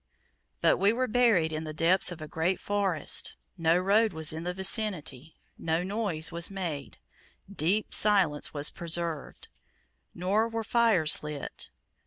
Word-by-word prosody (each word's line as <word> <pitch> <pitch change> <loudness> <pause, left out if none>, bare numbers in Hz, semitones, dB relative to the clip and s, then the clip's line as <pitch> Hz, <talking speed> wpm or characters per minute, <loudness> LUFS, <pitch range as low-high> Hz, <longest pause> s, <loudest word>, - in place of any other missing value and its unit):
But - - +4
we 200 +2 +4
were 255 +3 0
buried 215 -10 +3
in 155 +1 -3
the 155 -1 -7
depths 175 +4 +2
of 170 -2 -8
a - - -7
great 170 +4 -1
forest 200 -4 -1 0.2
no 165 -1 +2
road 205 +3 +2
was 160 -1 -3
in 160 +2 -6
the 180 - -1
vicinity, 180 - -1 0.2
no 165 +1 -1
noise 190 -5 -1
was 170 0 +1
made, 170 -8 -5 0.6
deep 195 +7 0
silence 190 -8 +3
was 145 0 0
preserved; 170 -3 -3 0.7
nor 200 +6 +1
were 225 0 -3
fires 220 -9 +2
lit. 150 -2 -7
175 Hz, 145 wpm, -28 LUFS, 160-205 Hz, 0.7 s, But